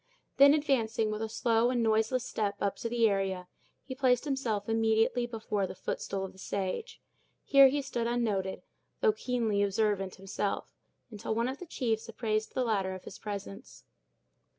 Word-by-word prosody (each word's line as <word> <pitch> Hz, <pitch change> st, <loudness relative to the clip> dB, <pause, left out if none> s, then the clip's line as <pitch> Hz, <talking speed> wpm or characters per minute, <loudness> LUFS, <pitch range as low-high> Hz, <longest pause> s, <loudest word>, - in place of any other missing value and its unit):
Then, 280 Hz, +1 st, +8 dB
advancing 230 Hz, -7 st, +1 dB
with 215 Hz, 0 st, -3 dB
a 220 Hz, -, -2 dB
slow 230 Hz, +1 st, +2 dB
and 245 Hz, -2 st, +1 dB
noiseless 220 Hz, +3 st, +2 dB
step 205 Hz, -2 st, -1 dB
up 200 Hz, -1 st, -1 dB
the 230 Hz, -1 st, +2 dB
area, 190 Hz, -3 st, -1 dB, 0.4 s
he 265 Hz, -, -6 dB
placed 255 Hz, -1 st, +2 dB
himself 240 Hz, -8 st, -1 dB
immediately 225 Hz, +2 st, +2 dB
before 215 Hz, -4 st, -2 dB
the -, -, -8 dB
footstool 195 Hz, 0 st, -3 dB
of 190 Hz, -, -8 dB
the 190 Hz, -, -18 dB
sage. 200 Hz, -, -3 dB, 0.4 s
Here 275 Hz, -1 st, +7 dB
he 280 Hz, +2 st, 0 dB
stood 240 Hz, -3 st, -2 dB
unnoted, 210 Hz, -6 st, -1 dB, 0.4 s
though 450 Hz, -3 st, +4 dB
keenly 235 Hz, -, 0 dB
observant 200 Hz, -1 st, 0 dB
himself, 195 Hz, +1 st, -3 dB, 0.4 s
until 215 Hz, 0 st, -3 dB
one 230 Hz, +2 st, +1 dB
of 265 Hz, +2 st, -4 dB
the 360 Hz, -, -8 dB
chiefs 230 Hz, -7 st, -2 dB
apprised 215 Hz, -1 st, -2 dB
the 255 Hz, -, +1 dB
latter 195 Hz, -5 st, 0 dB
of 185 Hz, -, -10 dB
his -, -, -10 dB
presence. 200 Hz, -, -7 dB
225 Hz, 165 wpm, -30 LUFS, 200-250 Hz, 0.4 s, Then